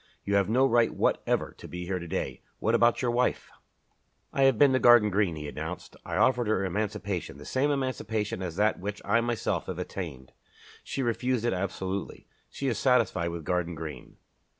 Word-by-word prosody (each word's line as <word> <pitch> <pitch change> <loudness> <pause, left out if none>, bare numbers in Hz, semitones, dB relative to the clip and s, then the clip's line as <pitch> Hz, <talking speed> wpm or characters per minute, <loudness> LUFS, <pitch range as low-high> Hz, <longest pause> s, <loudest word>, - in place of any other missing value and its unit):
You 100 - -2
have 100 -1 +3
no 130 +4 +4
right 120 -3 +3
whatever - - 0
to - - -9
be 90 0 -6
here 90 0 -2
to 85 - -7
day. 95 +3 -3 0.2
What - - 0
about 120 +2 +3
your 120 - +2
wife?" 125 +1 0 0.8
"I 135 - +3
have 135 -4 +4
been 140 0 +6
to 130 - +3
Garden 120 -4 +6
Green," 95 -4 +1
he 75 -1 -6
announced. - - -6
"I - - -4
offered 125 -3 +3
her 100 -3 +1
emancipation, 100 -5 -3
the 75 - -11
same 135 +3 +1
emancipation 115 -8 -2
as 90 -3 -4
that 105 +3 +2
which 100 +2 -4
I 115 - +3
myself 120 -1 -1
have - - -4
attained. 70 -9 -6 0.5
She 135 - -3
refused 120 0 0
it 120 - +2
absolutely. 95 +1 -4 0.2
She 140 - -6
is 120 - 0
satisfied 110 -9 +2
with 85 -1 -6
Garden 90 0 -1
Green." 80 -1 -8
105 Hz, 190 wpm, -28 LUFS, 90-120 Hz, 0.8 s, been